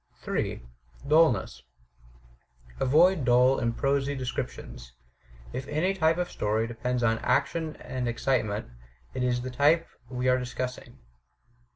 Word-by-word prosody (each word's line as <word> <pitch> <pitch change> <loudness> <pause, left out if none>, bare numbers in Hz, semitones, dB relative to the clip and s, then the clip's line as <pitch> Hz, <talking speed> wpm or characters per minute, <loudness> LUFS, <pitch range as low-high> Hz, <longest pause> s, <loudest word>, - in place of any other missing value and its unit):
J, - - -2 0.4
DtUlness 140 - +3 1.2
Avoid 155 +5 +4
dull 125 +2 +4
and 115 -2 -1
prosy 140 0 0
description. 125 - -5 0.7
If 130 - -5
any 160 +7 0
t)^e 165 -3 +2
of 180 0 -2
story 110 +2 0
depends 120 +1 -2
on 115 -1 +2
action 155 +5 0
and 125 -1 -4
excitement, 115 -3 0 0.5
it 130 - -3
is 125 -1 +1
the 130 - -5
type 150 +6 +3 0.2
we 125 0 -2
are 130 0 +4
dis 125 -1 -6
cussing. 125 -1 -5
130 Hz, 130 wpm, -27 LUFS, 120-150 Hz, 1.2 s, Avoid